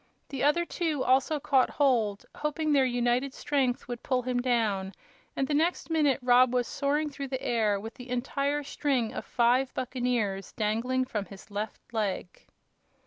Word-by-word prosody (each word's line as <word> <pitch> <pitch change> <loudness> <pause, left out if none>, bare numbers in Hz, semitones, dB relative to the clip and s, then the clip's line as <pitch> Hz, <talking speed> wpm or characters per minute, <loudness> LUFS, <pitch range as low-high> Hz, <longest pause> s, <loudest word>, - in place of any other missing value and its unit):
The 270 -2 -3
other 300 +4 +3
two 320 -6 -1
also 270 +4 +2
caught 270 -2 +3
hold, 230 -8 +1
hoping 300 0 -1
their 275 -2 +4
united 245 +2 0
strength 265 -4 0
would 245 -1 -5
pull 255 -2 0
him 245 0 0
down, 215 -6 0 0.4
and 270 - 0
the 295 - -1
next 325 +2 0
minute 300 -4 +3
Rob 250 0 +5
was 245 -1 +2
soaring 295 +4 -1
through 275 0 -5
the 260 -1 -4
air 215 -4 +1
with 225 +3 -7
the 250 -1 -11
entire 280 +4 -1
string 270 -5 -1
of - - -4
five 250 +2 +2
buccaneers 245 -6 -1
dangling 235 +4 0
from 210 -5 -3
his 195 +2 -13
left 210 +1 -4
leg. 205 -5 -3
255 Hz, 165 wpm, -28 LUFS, 230-280 Hz, 0.4 s, Rob